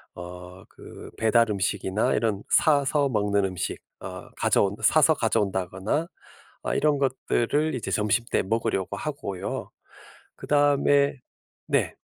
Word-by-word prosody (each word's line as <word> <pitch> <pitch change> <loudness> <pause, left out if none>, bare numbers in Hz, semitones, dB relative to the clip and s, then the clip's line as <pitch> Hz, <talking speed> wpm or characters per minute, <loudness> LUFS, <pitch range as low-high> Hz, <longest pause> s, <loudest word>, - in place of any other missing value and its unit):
어 90 +1 -10
그 - - -12
배달 110 0 +3
음식이나 95 +1 0
이런 105 -3 0
사서 145 -1 +3
먹는 100 -3 +1
음식 90 -2 -3 0.2
어 - - -8
가져온 100 0 +2
사서 155 0 +5
가져온다거나 100 - -1 0.6
아 - - -1
이런 150 -2 +2
것들을 140 +2 0
이제 120 - -4
점심 105 +2 +1
때 - - +2
먹으려고 95 -2 -1
하고요. 135 -11 -5 0.7
그다음에 145 -1 +2 0.5
네. - - +1
110 Hz, 255 characters per minute, -25 LUFS, 95-140 Hz, 0.7 s, 사서